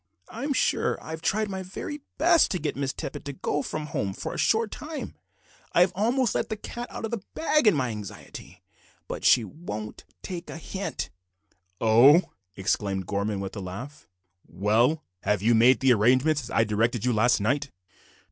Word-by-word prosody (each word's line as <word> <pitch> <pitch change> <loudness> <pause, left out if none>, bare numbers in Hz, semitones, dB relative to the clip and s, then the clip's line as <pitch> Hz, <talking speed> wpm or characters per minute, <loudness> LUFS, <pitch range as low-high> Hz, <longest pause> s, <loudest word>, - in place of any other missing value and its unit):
I'm 285 - -4
sure 275 - +1
I - - -9
have 160 0 -5
tried 215 +5 +1
my 190 -1 -4
very 195 +10 -6 0.2
best 335 +2 +5
to 185 - -1
get 150 -1 -2
Miss 135 -1 -1
Tippet - - -6
to 140 - -4
go 145 +2 -2
from 150 +2 -4
home 100 -9 -2
for - - -5
a - - -6
short 225 -1 +2
time, 305 0 -6 0.6
I've 180 +1 +5
almost 235 +4 +1
let - - -1
the 220 - -2
cat 240 +3 -6
out - - -5
of 225 - -5
the 230 -4 -3
bag 305 -5 +2
in 210 - +6
my 130 -3 0
anxiety, 105 -3 -9 0.4
but - - -6
she 120 - +6
won't 105 - -7 0.2
take 175 -2 -6
the - - -7
hint." 195 +4 -5 0.7
"Oho!" 125 +10 +6 0.2
exclaimed 95 0 -1
Gorman, 100 +1 -2
with 95 +1 -6
a - - -4
laugh. 125 +12 -8 0.4
"Well, 110 - +2 0.2
have 105 -1 0
you 115 +2 +4
made 120 +2 +5
the 130 -2 +5
arrangements 130 +7 +3
as 120 - -9
I 115 - +3
directed 110 +2 0
you 125 - +2
last 115 +3 +3
night?" 140 +7 0
135 Hz, 185 wpm, -26 LUFS, -, 0.7 s, in